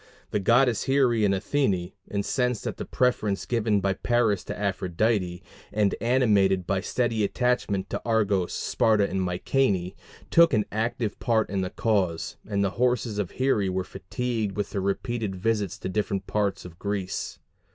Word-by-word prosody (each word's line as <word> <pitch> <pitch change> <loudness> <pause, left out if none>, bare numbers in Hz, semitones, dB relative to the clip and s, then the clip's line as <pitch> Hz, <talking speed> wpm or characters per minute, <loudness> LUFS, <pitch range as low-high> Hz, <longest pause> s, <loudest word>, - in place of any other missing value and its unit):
The 105 - +1
goddesses 120 +3 +3
Here 135 -2 +3
and 105 -3 +2
Athene, 100 -4 0 0.2
incensed 125 +4 -1
at - - -3
the - - -5
preference 110 -6 0
given 110 -4 +1
by 100 0 +1
Paris 110 -3 +1
to - - -5
Aphrodite, 95 -1 0 0.3
and 105 -2 +2
animated 105 -7 +3
by 95 +1 0
steady 115 0 0
attachment 105 -3 0
to - - -2
Argos, 105 -6 +1
Sparta, 105 -3 +2
and 95 - -2
Mycenæ, 95 +1 0 0.4
took 170 -5 +6
an 105 -1 +1
active 115 0 -2
part 115 -3 +1
in 100 -1 0
the 90 - -2
cause, 95 -8 0
and 100 -1 +1
the 100 - +1
horses 120 -4 +1
of 100 -4 -1
Here 120 -8 +1
were 95 0 -1
fatigued 105 +2 -3
with 105 - -3
her 100 - -1
repeated 100 +1 -2
visits 105 -1 -1
to - - -26
the - - -2
different 100 -1 -1
parts 100 -3 -1
of 85 -1 -11
Greece. 100 -2 -3
105 Hz, 160 wpm, -26 LUFS, 95-120 Hz, 0.4 s, took